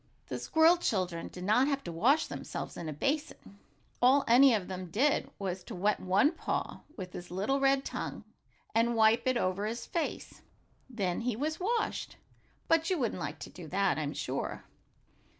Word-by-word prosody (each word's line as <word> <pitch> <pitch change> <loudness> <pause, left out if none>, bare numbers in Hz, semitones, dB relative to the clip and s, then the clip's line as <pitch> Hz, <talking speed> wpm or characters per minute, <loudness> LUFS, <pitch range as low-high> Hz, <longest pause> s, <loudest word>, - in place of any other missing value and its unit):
The - - -3
squirrel 325 +2 +4
children 185 - -1
did 180 - -9
not 220 +7 +3
have 280 -1 -1
to 170 - -5
wash 260 - +3
themselves - - -6
in 165 - -5
a - - -3
basin. 275 - -3 0.4
All 265 +3 +5
any 255 +3 +7
of 195 -4 -3
them 185 -1 -5
did 265 - +1
was 185 -2 -4
to - - -7
wet 205 +4 +1
one 195 +11 +3
paw 335 - -3 0.2
with 185 -3 -7
his 175 - -8
little 200 +10 0
red 275 0 +3
tongue, - - -5 0.5
and 235 +1 +2
wipe 225 +2 +4
it 255 -1 +2
over 190 0 0
his 235 +2 -4
face. 335 - -4 0.5
Then 195 -7 -2
he 240 -1 -1
was 305 +6 -2
washed. 450 +5 -1 0.5
But 330 0 +3
you 370 - +1
wouldn't 240 -7 -2
like - - -4
to - - -8
do 175 -3 -10
that, 195 -1 +1
I'm 145 -1 -3
sure. - - -3
225 Hz, 180 wpm, -31 LUFS, 185-275 Hz, 0.5 s, any